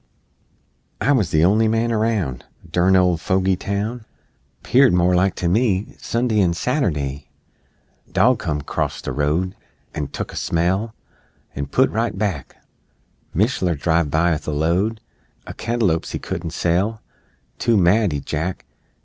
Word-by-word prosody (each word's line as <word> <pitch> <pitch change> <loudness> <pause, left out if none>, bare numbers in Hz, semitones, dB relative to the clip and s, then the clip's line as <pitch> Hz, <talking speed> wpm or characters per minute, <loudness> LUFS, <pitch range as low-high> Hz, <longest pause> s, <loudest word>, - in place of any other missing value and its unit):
I 145 - +2
wuz 125 -8 +3
the 80 0 +2
on'y 105 +5 +4
man 115 +1 +1
aroun' 105 - 0 0.3
(Durn 90 +3 +3
old 90 -3 +3
fogy 95 0 +1
town! 105 +5 -3 0.6
'Peared 130 -4 +4
more 90 +1 +3
like, 90 +1 +2
to 90 - -2
me, 100 +1 +1
Sund'y 115 -2 0
'an 85 -2 +2
Saturd'y!) 75 - -1 0.8
Dog 125 +1 +3
come 75 -7 -2
'crost - - -3
the - - -2
road 75 +7 0 0.4
An' 75 - -3
tuck - - -6
a - - -9
smell 95 +7 0 0.6
An' 70 0 -4
put 130 - +2
right 115 -1 -1
back; 95 -9 -3 0.8
Mishler 95 - +1
driv 80 +1 +1
by 85 +3 +2
'ith 80 - -5
a - - 0
load 90 +9 0 0.4
O' - - -7
cantalo'pes 110 -8 -1
he - - -1
couldn't 85 -1 -5
sell 90 +7 0 0.6
Too 115 -2 +2
mad, 100 +2 +3
'y 70 -1 -3
jack! 80 +4 -3
95 Hz, 145 wpm, -21 LUFS, 80-110 Hz, 0.8 s, on'y